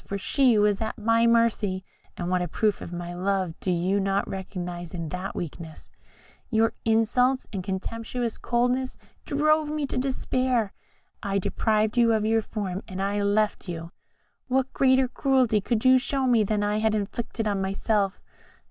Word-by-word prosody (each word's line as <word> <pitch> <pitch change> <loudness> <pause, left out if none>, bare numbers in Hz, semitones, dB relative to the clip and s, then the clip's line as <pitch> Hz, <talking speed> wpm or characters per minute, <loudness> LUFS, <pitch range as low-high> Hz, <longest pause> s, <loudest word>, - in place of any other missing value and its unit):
for 200 - -4
she 250 +3 +3
was 205 0 +2
at 220 +2 -3
my 230 +1 +3
mercy 220 -5 +2 0.3
and 175 - -3
what 180 0 +1
a 175 - -1
proof 210 +4 0
of - - -7
my 175 0 -5
love 185 -1 -1
do 185 - -1
you 180 +3 +1
not 195 0 0
recognise 180 -2 -6
in 165 -2 -4
that 180 +4 -5
weakness? 160 -1 -7 0.6
Your 225 -1 +2
insults 240 +4 +2
and 190 -2 -3
contemptuous 230 +5 -3
coldness 250 +2 0 0.3
drove 305 +1 +2
me 300 -1 -1
to 260 - -2
despair. 255 -4 0 0.5
I 200 0 -1
deprived 215 +3 +1
you 230 -1 +5
of 215 -1 +1
your 225 +1 +3
form, 200 -3 -4
and 185 0 -6
I 200 +1 0
left 205 -1 +1
you. 165 0 -6 0.6
What 265 0 0
greater 260 -1 +4
cruelty 255 -4 +2
could 225 +3 -1
you 255 0 +7
show 270 +1 -1
me 240 -4 +4
than 205 0 0
I 210 +1 0
had 220 0 +2
inflicted 220 +2 -3
on 200 -2 0
myself? 195 +1 0
215 Hz, 165 wpm, -26 LUFS, 190-245 Hz, 0.6 s, you